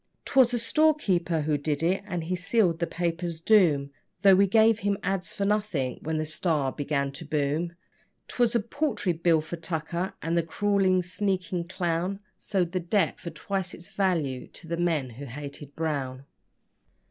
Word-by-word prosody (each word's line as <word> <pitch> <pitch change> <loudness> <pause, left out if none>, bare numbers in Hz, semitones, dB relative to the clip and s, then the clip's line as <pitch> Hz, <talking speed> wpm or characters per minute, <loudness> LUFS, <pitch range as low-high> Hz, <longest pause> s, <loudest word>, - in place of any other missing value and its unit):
'Twas 260 -3 +4
a 245 - +1
storekeeper 225 - +2
who 150 -1 0
did 145 +1 -1
it, 185 +3 +2
and 175 -4 -3
he 180 +3 -1
sealed 180 -2 +1
the 170 - 0
paper's 170 -1 -2
doom, 165 -8 +4 0.3
Though 195 -1 +8
we 195 +1 +5
gave 220 +2 +4
him 200 -1 0
ads. 185 -2 -1
for 200 - -2
nothing 200 -11 0
when 160 +1 -2
the 155 - -1
STAR 155 -3 0
began 140 -1 -1
to 140 - -7
boom: 155 +3 -1 0.5
'Twas 240 -1 +1
a 235 - +3
paltry 260 - -1
bill 165 -1 +3
for 160 +3 -6
tucker, 170 +2 -3
and 165 +1 -1
the 170 - +4
crawling, 190 +1 +2
sneaking 185 -2 -2
clown 180 +1 -1 0.2
Sold 185 -4 -1
the 185 - 0
debt 180 +4 +1
for 170 - -6
twice 190 -1 -3
its 175 - -12
value 165 -10 0
to 170 - -13
the 170 - -1
men 165 -7 0
who 135 +5 -8
hated 140 +2 -8
Brown. 140 -5 -3
170 Hz, 170 wpm, -27 LUFS, 155-195 Hz, 0.5 s, Though